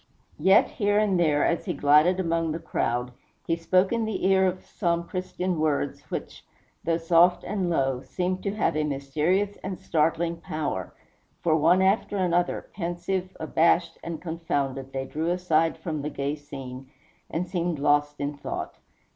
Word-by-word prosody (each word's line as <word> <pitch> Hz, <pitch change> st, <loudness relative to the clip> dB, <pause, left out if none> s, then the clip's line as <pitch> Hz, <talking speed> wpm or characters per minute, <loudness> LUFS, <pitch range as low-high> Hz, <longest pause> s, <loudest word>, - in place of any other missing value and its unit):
Yet 190 Hz, +1 st, +5 dB
here 205 Hz, 0 st, 0 dB
and 205 Hz, -4 st, +2 dB
there, 150 Hz, -4 st, +3 dB
as 170 Hz, -, 0 dB
he -, -, -1 dB
glided 150 Hz, +6 st, +4 dB
among 165 Hz, -3 st, 0 dB
the -, -, -2 dB
crowd, 125 Hz, -6 st, -2 dB, 0.3 s
he 165 Hz, -, +1 dB
spoke 185 Hz, +4 st, +2 dB
in 230 Hz, -1 st, 0 dB
the 220 Hz, -3 st, -2 dB
ear 190 Hz, 0 st, +4 dB
of 185 Hz, 0 st, -3 dB
some 170 Hz, -1 st, -1 dB
Christian 180 Hz, -1 st, -3 dB
words 145 Hz, -2 st, 0 dB
which, -, -, -6 dB, 0.4 s
though 165 Hz, 0 st, +1 dB
soft 170 Hz, +2 st, +4 dB
and 195 Hz, -4 st, -1 dB
low, 135 Hz, -6 st, +1 dB
seemed 185 Hz, +4 st, -2 dB
to 200 Hz, 0 st, -2 dB
have 215 Hz, -, +1 dB
a 155 Hz, -, +1 dB
mysterious 150 Hz, +8 st, 0 dB
and 190 Hz, -1 st, -6 dB
startling 165 Hz, +2 st, 0 dB
power; 155 Hz, -, -4 dB, 0.5 s
for 160 Hz, -2 st, +3 dB
one 170 Hz, +4 st, +4 dB
after 200 Hz, +1 st, +2 dB
another, 175 Hz, -1 st, 0 dB
pensive, 180 Hz, +1 st, -3 dB
abashed, 165 Hz, +2 st, +2 dB
and 165 Hz, -2 st, -5 dB
confounded, 140 Hz, -6 st, -2 dB
they 135 Hz, 0 st, -3 dB
drew 155 Hz, +5 st, -2 dB
aside 165 Hz, -3 st, +1 dB
from 155 Hz, -4 st, -4 dB
the 150 Hz, -, -3 dB
gay 140 Hz, 0 st, -2 dB
scene, 135 Hz, -3 st, -9 dB, 0.4 s
and 175 Hz, +3 st, -2 dB
seemed 175 Hz, -2 st, -1 dB
lost 145 Hz, +1 st, +2 dB
in 145 Hz, +1 st, -2 dB
thought. 140 Hz, -, -6 dB
165 Hz, 165 wpm, -26 LUFS, 150-185 Hz, 0.5 s, Yet